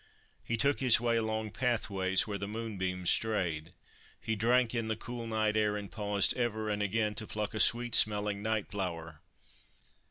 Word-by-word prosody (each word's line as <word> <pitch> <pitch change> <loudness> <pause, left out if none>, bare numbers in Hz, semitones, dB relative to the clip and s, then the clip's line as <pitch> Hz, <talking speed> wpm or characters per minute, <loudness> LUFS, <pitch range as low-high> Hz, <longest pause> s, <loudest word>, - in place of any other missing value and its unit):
He 115 - -2
took 140 +4 +2
his 125 -4 +5
way 120 0 +1
along 110 -1 -2
pathways 100 -6 0
where 100 -2 -4
the 100 - -4
moonbeams 95 -5 -2
strayed. 90 -7 -1 0.5
He 110 - -2
drank 120 +2 +2
in 115 -2 -1
the 110 - -1
cool 120 +1 -6
night 110 -1 0
air, 105 -1 +1
and 100 -1 -7
paused 105 -2 +2
ever 110 -3 -1
and 105 0 -1
again 105 +1 0
to 110 +1 -6
pluck 105 0 -3
a 110 - -3
sweet 120 +3 +4
smelling 105 -2 +2
night 110 -1 -1
flower. 85 -6 -5
110 Hz, 170 wpm, -31 LUFS, 100-115 Hz, 0.5 s, his